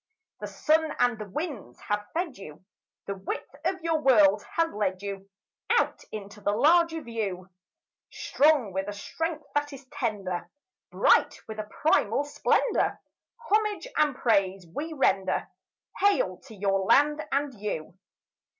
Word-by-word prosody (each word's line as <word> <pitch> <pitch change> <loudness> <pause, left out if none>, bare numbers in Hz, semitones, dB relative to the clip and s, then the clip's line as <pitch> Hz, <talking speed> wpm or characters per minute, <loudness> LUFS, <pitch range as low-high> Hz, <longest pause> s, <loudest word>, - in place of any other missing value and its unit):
The - - -5
sun 315 0 +1
and 245 -2 +2
the 210 -1 -7
winds 265 - -5
have 210 0 -2
fed 335 -5 -1
you; 180 -2 -12 0.4
The 200 - -3
width 195 0 -6
of 365 0 -1
your 325 -2 +1
world 210 -7 +5
has 330 -1 +1
led 195 -2 -1
you 195 -1 -6 0.4
Out - - +2
into 210 0 -8
the 205 0 +1
larger 325 +6 +3
view; 200 -6 -4 0.6
Strong 285 - +2
with 190 +1 -2
a 205 - -3
strength 320 +10 -4
that 290 0 0
is 275 0 -11
tender, 210 -10 -3 0.4
Bright - - +3
with 220 -1 -7
a 210 0 -5
primal 280 -4 +3
splendour, 290 +10 +1 0.5
Homage 425 +2 +1
and 295 -3 +2
praise 195 -6 +1
we 315 +7 -4
render— 195 -10 +1 0.5
Hail 405 +5 +2
to 225 - -11
your 195 -1 +1
land 290 +10 +3
and 280 0 0
you! 175 -5 -4
230 Hz, 140 wpm, -27 LUFS, 200-305 Hz, 0.6 s, world